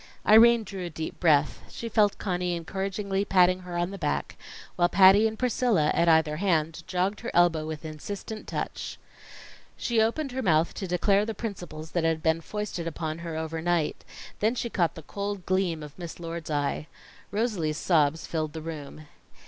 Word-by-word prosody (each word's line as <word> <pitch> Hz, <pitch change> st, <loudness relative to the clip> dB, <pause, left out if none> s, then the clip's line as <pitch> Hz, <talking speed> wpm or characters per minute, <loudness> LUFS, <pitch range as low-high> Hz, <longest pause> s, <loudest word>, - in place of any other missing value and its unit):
Irene 230 Hz, +1 st, +7 dB
drew 195 Hz, -2 st, -6 dB
a -, -, -6 dB
deep 160 Hz, 0 st, -6 dB
breath 150 Hz, -4 st, +3 dB
she 230 Hz, -, -6 dB
felt 210 Hz, -2 st, +2 dB
Conny 180 Hz, -2 st, -1 dB
encouragingly 195 Hz, +3 st, -2 dB
patting 185 Hz, -2 st, +4 dB
her 180 Hz, -1 st, -6 dB
on 175 Hz, +2 st, -1 dB
the 200 Hz, -, -7 dB
back, 70 Hz, -, -2 dB, 0.4 s
while 175 Hz, 0 st, +3 dB
Patty 195 Hz, +3 st, +7 dB
and 220 Hz, 0 st, -5 dB
Priscilla, 235 Hz, -10 st, +2 dB
at 170 Hz, -, +3 dB
either 160 Hz, -2 st, +3 dB
hand, 165 Hz, -3 st, 0 dB
jogged 185 Hz, +2 st, -1 dB
her 235 Hz, -, -5 dB
elbow 165 Hz, -3 st, +3 dB
with 155 Hz, 0 st, -6 dB
insistent 200 Hz, +8 st, -7 dB
touch. -, -, -4 dB, 0.8 s
She 235 Hz, -2 st, +1 dB
opened 265 Hz, +6 st, 0 dB
her 260 Hz, +1 st, -3 dB
mouth 165 Hz, -5 st, +2 dB
to 195 Hz, -, -5 dB
declare 195 Hz, +3 st, +2 dB
the 220 Hz, 0 st, -4 dB
principles 175 Hz, -8 st, -6 dB
that 175 Hz, -, 0 dB
had 165 Hz, -1 st, 0 dB
been 160 Hz, +1 st, +2 dB
foisted 200 Hz, -3 st, -4 dB
upon 160 Hz, 0 st, -4 dB
her 165 Hz, -2 st, -5 dB
over 160 Hz, 0 st, -3 dB
night; 170 Hz, -2 st, 0 dB, 0.4 s
then 220 Hz, +4 st, +2 dB
she 235 Hz, -1 st, -3 dB
caught 170 Hz, -3 st, +1 dB
the 160 Hz, -, -9 dB
cold 200 Hz, +3 st, -5 dB
gleam 180 Hz, -4 st, 0 dB
of 150 Hz, +3 st, -11 dB
Miss 170 Hz, -1 st, -7 dB
Lord's 165 Hz, -1 st, -6 dB
eye. 145 Hz, 0 st, -1 dB, 0.4 s
Rosalie's 200 Hz, -8 st, -1 dB
sobs 160 Hz, -3 st, +2 dB
filled 155 Hz, -2 st, -3 dB
the 160 Hz, -, -6 dB
room. 155 Hz, -1 st, -7 dB
175 Hz, 180 wpm, -27 LUFS, 160-200 Hz, 0.8 s, Irene